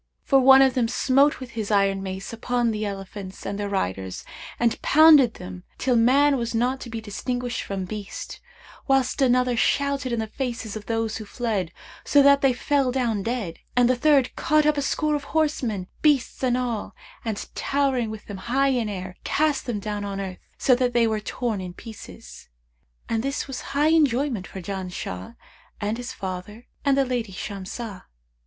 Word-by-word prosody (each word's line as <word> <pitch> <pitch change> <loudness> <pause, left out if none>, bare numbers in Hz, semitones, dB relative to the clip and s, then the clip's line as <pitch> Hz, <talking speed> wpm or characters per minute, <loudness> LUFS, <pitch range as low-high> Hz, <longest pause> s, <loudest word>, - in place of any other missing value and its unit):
For 270 - +4
one 265 +1 +8
of 265 -1 +3
them 240 -2 +1
smote 275 +4 +3
with 255 -2 -8
his 220 -3 -4
iron 195 -2 +2
mace 190 +2 -6
upon 240 0 0
the 215 -1 -2
elephants 195 -1 -7
and 200 +1 -3
their 205 -1 -2
riders 95 - -3 0.3
and 235 -1 +1
pounded 300 -6 +6
them 180 0 -9
till 255 -1 +1
man 275 +5 +4
was 235 -1 -3
not 250 +3 +1
to 245 - -8
be 225 0 -4
distinguished 245 +3 -3
from 195 -2 -4
beast; 205 +1 -7 0.5
whilst 270 0 +2
another 250 -1 +3
shouted 280 +1 +1
in 235 - 0
the 220 - -1
faces 230 -2 -4
of 215 -1 -7
those 225 -1 -1
who 215 - -7
fled, 205 -6 -2 0.3
so 285 -1 +5
that 280 0 +6
they 270 - +4
fell 270 +1 +1
down 240 -5 0
dead; 220 -6 -3 0.2
and 245 -1 +5
the 255 - +3
third 275 0 +3
caught 305 0 +2
up 300 0 +3
a 285 - 0
score 300 +2 0
of 290 -1 -2
horsemen, 255 -11 0 0.2
beasts 290 -5 +2
and 250 -2 +2
all; 240 -4 -3 0.3
and, 220 -3 -4
towering 270 -5 0
with 215 -1 -8
them 205 - -7
high 265 +7 +1
in 245 -5 0
air, 185 -2 -6
cast 300 -3 +1
them 230 -4 -2
down 205 0 -4
on 200 -1 -4
earth, 190 -2 -5 0.2
so 260 - +4
that 245 0 +1
they 235 -1 +4
were 220 -1 0
torn 215 -1 -3
in 180 -1 -7
pieces. 225 -3 -11 0.6
And 225 -1 0
this 275 +3 -2
was 270 -2 -5 0.2
high 300 +2 +4
enjoyment 275 - +2
for 190 - -8
Janshah 180 - -5 0.4
and 210 +2 -2
his 245 +1 -5
father 195 +4 -6 0.2
and 280 -2 +3
the 275 - +3
lady 245 -5 -2
Shamsah." 200 +2 -6
235 Hz, 185 wpm, -24 LUFS, 205-265 Hz, 0.6 s, one